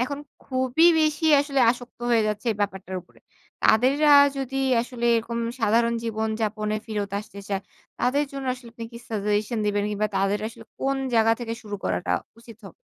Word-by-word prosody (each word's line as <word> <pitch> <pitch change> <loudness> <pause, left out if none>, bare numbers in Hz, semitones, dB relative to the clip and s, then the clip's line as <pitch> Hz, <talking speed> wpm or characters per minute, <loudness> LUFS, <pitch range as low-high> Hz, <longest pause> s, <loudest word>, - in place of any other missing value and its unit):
এখন 280 +3 -3 0.3
খুবই 260 +5 +2
বেশি 310 +1 +1 0.2
আসলে 280 -1 0
আসক্ত 245 0 -7
হয়ে 230 -2 +4
যাচ্ছে 210 +3 -4
এই - - -10
ব্যাপারটার 190 -2 -3
উপরে, 175 - -25 0.4
তাদেররা 275 +7 +4 0.3
যদি 270 0 -4 0.3
আসলে 240 -1 -6
এরকম 235 +1 -3 0.2
সাধারণ 230 +2 +3
জীবনযাপনে 220 -1 -2
ফেরত 205 -2 -3
আসতে 200 -1 -11
চায়, 195 -1 -2 0.4
তাদের 280 +4 +2
জন্য 275 -1 -5
আসলে 250 -2 -13
আপনি 230 0 -7
কি 235 - -8
suggestion 210 +1 -1
দিবেন, 205 0 +1
কিংবা 210 +1 0
তাদের 195 +2 +1
আসলে 225 - -13 0.2
কোন 275 0 0 0.2
জায়গা 225 0 +5
থেকে 230 -1 -4
শুরু 210 -2 -6
করাটা - - -1 0.3
উচিত 230 -2 -13
হবে? 190 - -12
230 Hz, 170 wpm, -25 LUFS, 210-255 Hz, 0.4 s, জায়গা